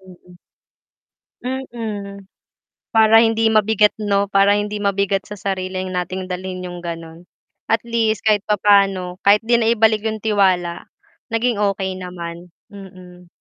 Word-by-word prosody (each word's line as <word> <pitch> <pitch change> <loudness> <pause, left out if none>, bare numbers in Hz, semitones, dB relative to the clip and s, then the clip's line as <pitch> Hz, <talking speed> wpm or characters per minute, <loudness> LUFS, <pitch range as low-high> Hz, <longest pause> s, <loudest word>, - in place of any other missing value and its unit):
Mm. 180 -1 -17 1.1
Mm, 220 -6 -6 0.7
para 220 0 +6
hindi 225 0 +3
mabigat 215 0 +3
'no, 200 -1 0
para 200 0 +4
hindi 205 0 -2
mabigat 200 -1 -1
sa 210 - -7
sarili 185 -1 -3
nating 185 0 -4
dalhin 185 0 -5
yung 175 -1 -7
ganun. 165 0 -8 0.4
At 225 -1 +1
least 225 -2 -1
kahit 210 -2 +1
papaano, 195 -3 +2
kahit 210 +2 +5
'di 235 +2 +2
na 225 - +1
ibalik 220 -1 +2
yung 220 -1 -4
tiwala 185 -5 +1 0.4
naging 230 -1 -1
okey 195 -2 -1
naman, 175 -1 -8 0.2
mm. 185 -3 -13
200 Hz, 130 wpm, -19 LUFS, 185-215 Hz, 1.1 s, para